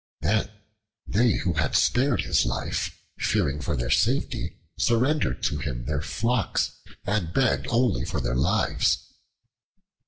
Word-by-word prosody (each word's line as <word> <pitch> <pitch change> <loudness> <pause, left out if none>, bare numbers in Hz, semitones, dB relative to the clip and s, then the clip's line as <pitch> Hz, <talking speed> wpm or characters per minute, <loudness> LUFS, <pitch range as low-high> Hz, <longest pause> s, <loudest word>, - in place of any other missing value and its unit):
Then 105 +1 +1 0.6
they 115 +1 +3
who 90 0 -1
had 80 -3 0
spared 130 +4 +3
his - - +2
life, - - -2 0.2
fearing 90 -10 0
for 70 - -2
their - - -2
safety, - - +1 0.2
surrendered 130 +6 +1
to 75 - 0
him 65 -4 -4
their 70 0 -1
flocks 115 +7 0 0.3
and 100 -5 -1
begged 130 +5 +1
only 120 -4 +2
for - - -2
their 60 - -1
lives. 90 +12 +2
100 Hz, 130 wpm, -26 LUFS, 75-120 Hz, 0.6 s, they